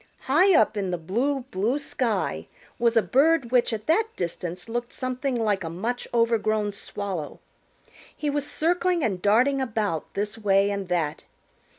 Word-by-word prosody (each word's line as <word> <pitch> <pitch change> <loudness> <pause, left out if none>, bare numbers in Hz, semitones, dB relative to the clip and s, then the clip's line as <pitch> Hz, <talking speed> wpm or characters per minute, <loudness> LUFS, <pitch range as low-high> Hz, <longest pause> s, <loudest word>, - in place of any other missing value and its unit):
High 350 +8 +4
up 220 0 +2
in 195 -2 -1
the 180 - -1
blue, 240 - -1
blue 215 +9 0
sky 210 - -2 0.3
was 235 -1 +3
a 225 - +5
bird 270 - +3
which 245 -1 +3
at 215 -1 -4
that 430 +8 +3
distance 175 +1 -4
looked 240 +1 -3
something 255 +1 -2
like 210 -5 0
a 165 - -4
much 225 +9 -3
overgrown 220 -3 +1
Swallow. 195 -6 -5 0.8
He 300 - -3
was 290 0 -1
circling 350 +1 +1
and 195 -6 -1
darting 250 +8 +3
about 215 -10 -2
this 210 +2 -2
way 200 -1 +3
and 200 -2 -3
that. 165 -4 -1
225 Hz, 160 wpm, -25 LUFS, 195-260 Hz, 0.8 s, a